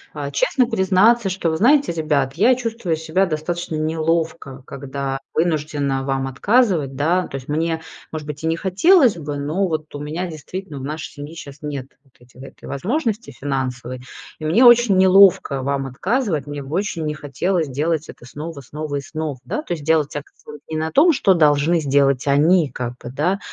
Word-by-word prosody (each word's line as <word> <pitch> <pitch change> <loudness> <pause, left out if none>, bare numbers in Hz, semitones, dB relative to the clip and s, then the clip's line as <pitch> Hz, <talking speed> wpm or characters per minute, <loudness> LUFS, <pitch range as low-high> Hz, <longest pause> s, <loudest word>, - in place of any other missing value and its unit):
а - - -4
честно 405 - +2
признаться, 200 +2 +3
что: 185 -3 -1
"Вы 160 - -1
знаете, 280 - +4
ребят, 150 -5 0
я 230 - +4
чувствую 230 -9 -2
себя 160 +5 0
достаточно 170 +1 -3
неловко, 160 -3 -2
когда 135 0 -5 0.2
вынуждена 150 -4 0
вам 135 0 -1
отказывать, 160 - +1
да". 170 +6 +1
То - - -8
есть 130 - -11
мне, 160 +2 -1 0.3
может 155 -2 -5
быть, 150 +1 -7
и - - 0
не 165 - +1
хотелось 240 - +4
бы, 145 -3 -5
но 155 +7 -1
вот 155 -3 -4
у 145 - -6
меня 155 +5 -4
действительно 165 0 -7
в 130 - -8
нашей 150 +2 -5
семье 145 +3 -9
сейчас 140 -3 -10
нет 145 -3 -5 0.2
вот 135 -3 -31
эти 125 +2 -16
этой - - -13
возможности 220 - -2
финансовой. 130 -2 -4 0.4
И 155 - -6
мне 205 +12 +4
очень 240 -5 +6
неловко 185 -7 +5
вам 140 0 -1
отказывать. 170 - -1
Мне 145 -1 -5
бы 135 +3 -9
очень 185 -5 -2
не 150 - -1
хотелось 155 +4 -1
делать 155 +3 -1
это - - -12
снова, 150 +3 -7
снова, 145 +2 -5
снова. 155 -1 -5
Да, 305 - -3
то - - -1
есть 155 -4 -6
делать 155 -2 +1
акцент 145 0 -9
не 155 - -1
на 160 0 -2
том, 330 +5 +6
что 195 -9 +3
должны 155 +1 +3
сделать 140 -2 +2
они, 155 +3 +4
как 125 -1 -5
бы, 120 - -6
да, 175 +8 0
155 Hz, 185 wpm, -20 LUFS, 140-185 Hz, 0.4 s, очень